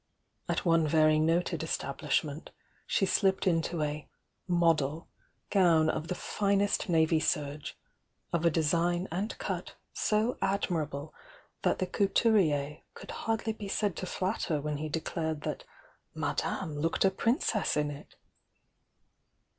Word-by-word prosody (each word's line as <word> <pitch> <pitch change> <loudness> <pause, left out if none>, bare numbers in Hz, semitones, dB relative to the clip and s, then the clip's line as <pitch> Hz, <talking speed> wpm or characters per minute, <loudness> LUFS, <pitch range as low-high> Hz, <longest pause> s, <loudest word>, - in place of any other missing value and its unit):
At - - -1
one 165 -2 +4
very 155 0 +4
noted 165 +1 +1
establishment, 150 -1 -2 0.4
she 195 - +2
slipped 190 0 +2
into 165 -2 +1
a 150 0 -4 0.4
"model" 165 -3 +2 0.4
gown 165 -5 +4
of 155 - -4
the 180 - -2
finest 200 0 0
navy 160 -1 +3
serge, 145 -1 -2 0.6
of 170 -1 +1
a 170 - +5
design 170 +3 +1
and 195 +6 -3
cut - - -4 0.2
so 220 +3 +1
admirable 160 -7 -1 0.5
that - - +2
the 185 - 0
couturier 180 -8 +2 0.2
could - - -9
hardly 225 0 -2
be 210 -2 -7
said 200 -2 0
to 185 - -4
flatter 185 -5 -1
when 150 0 -3
he 155 +1 -4
declared 160 0 -2
that - - -4 0.5
"Madame 155 -6 -2
looked 165 +5 +1
a 190 - +4
princess 225 - +1
in 150 0 +1
it." 145 0 -11
165 Hz, 130 wpm, -30 LUFS, 155-190 Hz, 0.6 s, a